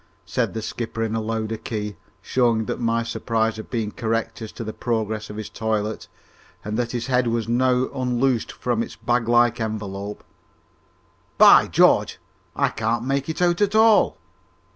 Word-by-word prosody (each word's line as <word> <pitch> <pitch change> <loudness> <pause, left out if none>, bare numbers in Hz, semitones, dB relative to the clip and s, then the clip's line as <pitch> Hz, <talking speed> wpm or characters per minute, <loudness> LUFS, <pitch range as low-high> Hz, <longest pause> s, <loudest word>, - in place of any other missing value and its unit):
said - - -1
the 110 - -3
skipper 115 0 -4
in 110 -1 -2
a 115 - -1
louder 110 0 -3
key, 105 -2 -5 0.3
showing 120 -3 +1
that - - -4
my 115 0 +1
surmise 115 -1 -1
had 110 - -8
been 110 -3 -2
correct 115 +1 -2
as 110 - -6
to 115 - -7
the 110 0 -5
progress 110 -2 -2
of 105 - -7
his 105 -1 -5
toilet, 110 -1 -3 0.6
and 105 +1 -3
that 120 0 -1
his 120 -2 -3
head 125 -1 +1
was 115 -1 -1
now 125 +2 +2
unloosed 125 -2 0
from 120 -2 -2
its - - -5
bag 120 -1 0
like 120 0 +3
envelope. 105 -2 -5 1.1
"By - - +8
George, - - +3 0.4
I - - +2
can't 115 +2 -1
make 135 +2 -1
it 160 +3 -1
out 175 +2 +2
at 205 +1 +2
all!" 220 -1 +5
115 Hz, 170 wpm, -23 LUFS, 110-125 Hz, 1.1 s, By